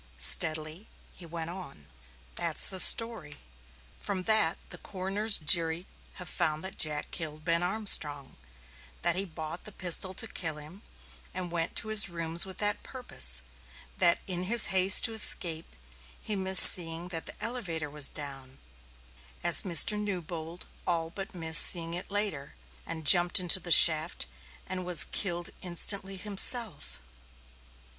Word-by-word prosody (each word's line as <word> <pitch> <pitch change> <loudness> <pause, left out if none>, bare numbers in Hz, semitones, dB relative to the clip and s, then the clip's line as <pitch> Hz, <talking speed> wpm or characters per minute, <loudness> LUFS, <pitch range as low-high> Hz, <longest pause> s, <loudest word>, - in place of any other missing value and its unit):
Steadily 155 - 0 0.3
he 175 - -14
went 165 0 -8
on. 175 - -13 0.5
"That's 170 -2 -1
the 190 -2 -4
story. 225 -9 +4 0.6
From 190 -2 -4
that 215 -6 +2
the - - -11
coroner's 200 +3 0
jury 165 +2 0 0.3
have 180 - -8
found 155 +1 -3
that 190 - -7
Jack 150 -1 -2
killed 155 -2 -8
Ben 170 -1 -1
Armstrong 175 -8 0 0.7
that - - 0
he 195 +2 -5
bought 160 -1 -10
the 215 - -8
pistol 185 0 -2
to - - +1
kill 160 -4 -7
him, 155 +7 -14 0.5
and 180 -2 -7
went 165 -1 -5
to 220 - -1
his 215 -2 +4
rooms 170 +1 -2
with 190 - -10
that 205 +1 -1
purpose; 65 - 0 0.6
that 170 - +2
in 180 -1 -4
his 230 +3 +5
haste 190 0 +3
to 225 - -1
escape, 170 - -1 0.4
he 215 - -4
missed 190 -1 +5
seeing 170 0 +3
that 165 -3 -7
the - - -12
elevator 190 -11 -5
was 145 -1 -1
down, 135 -3 -8 0.9
as - - +5
Mr. 185 +4 +5
Newbold 175 -4 -8 0.2
all 165 -2 -2
but 195 +1 -9
missed 165 -1 +4
seeing 165 -2 +1
it 175 +2 -5
later, 200 - -3 0.3
and 160 -2 -9
jumped 175 +4 +5
into 180 +1 +5
the 175 -1 -7
shaft 160 - +5 0.4
and 185 0 -7
was 180 -2 +5
killed 175 -3 -3
instantly 195 +2 -3
himself. 200 - -1
175 Hz, 145 wpm, -27 LUFS, 160-190 Hz, 0.9 s, his